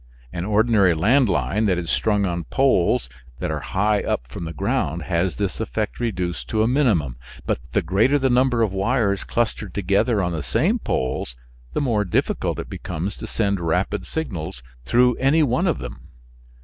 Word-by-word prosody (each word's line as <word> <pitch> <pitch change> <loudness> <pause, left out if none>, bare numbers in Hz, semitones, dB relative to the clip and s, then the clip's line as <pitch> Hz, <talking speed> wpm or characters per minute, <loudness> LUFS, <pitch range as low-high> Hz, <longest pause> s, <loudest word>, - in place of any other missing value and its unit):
An 85 0 -3
ordinary 105 -4 +3
land 115 - +3
line 105 +3 +1
that 90 -3 +2
is 85 -2 -3
strung 105 -2 +1
on 85 -2 -2
poles 95 - +2 0.3
that - - -3
are - - -2
high 105 +2 +1
up - - -2
from 85 +6 -6
the 80 - -4
ground 80 +1 -1
has 85 -2 0
this - - -2
effect - - -3
reduced 90 -7 -2
to 110 -1 +1
a - - +2
minimum, 105 - +1 0.3
but - - 0
the - - +2
greater 110 +10 +3
the 135 -1 +1
number 125 -2 +3
of 105 -4 0
wires 100 -1 +1
clustered 110 -4 -2
together 100 +3 +2
on 90 - -1
the 80 -2 -3
same 165 - +1
poles 65 - -2 0.4
the - - 0
more 115 -7 +1
difficult 90 - -1
it - - -5
becomes 90 +4 -4
to - - -7
send 100 -3 0
rapid 90 +3 -1
signals 85 - -4 0.2
through 125 - +4
any 145 +5 +3
one 145 +7 +1
of 165 - +1
them. 60 -1 -8
100 Hz, 180 wpm, -22 LUFS, 85-120 Hz, 0.4 s, through